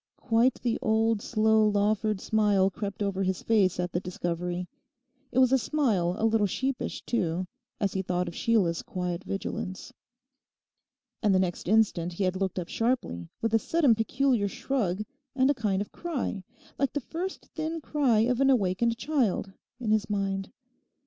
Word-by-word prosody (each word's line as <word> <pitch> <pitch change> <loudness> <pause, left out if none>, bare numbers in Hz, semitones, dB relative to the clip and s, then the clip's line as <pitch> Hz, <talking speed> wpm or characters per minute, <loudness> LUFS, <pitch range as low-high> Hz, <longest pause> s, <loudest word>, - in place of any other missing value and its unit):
Quite 235 +2 +2
the 235 -2 0
old 220 0 +2
slow 220 -1 +3
Lawford 210 0 +1
smile 205 -3 +2
crept 205 +1 -4
over 195 -1 -1
his 190 -1 -1
face 195 -6 +2
at 180 -1 -1
the 175 - 0
discovery. 175 0 -3 0.6
It - - -4
was 260 -1 +5
a 265 - +5
smile 215 - +1
a 220 - +1
little 220 -2 +3
sheepish 265 +6 -3
too, 180 -5 -1 0.3
as 200 -2 0
he 190 - 0
thought 180 -1 -1
of 170 - -5
Sheila's 185 -6 +1
quiet 180 0 -4
vigilance. 190 -1 -5 1.3
And 205 -4 +3
the - - +4
next 180 -2 -2
instant 190 -5 +2
he 195 - -2
had 185 0 +1
looked 190 0 -2
up 175 -2 -3
sharply, 225 - -1
with 225 -1 0
a 225 - +5
sudden 295 +1 +3
peculiar 230 0 +1
shrug, 210 -4 -1 0.3
and 265 +1 +4
a - - +2
kind 205 -6 0
of - - -16
cry, 275 - -3 0.4
like 275 - +1
the 290 - 0
first 350 +8 -5
thin 320 +1 -3
cry 275 -8 +2
of 245 +3 +1
an 270 - +5
awakened 230 -1 +2
child, 245 -9 0 0.3
in 230 -4 -1
his 215 0 +1
mind. 195 -1 -2
210 Hz, 170 wpm, -28 LUFS, 185-240 Hz, 1.3 s, was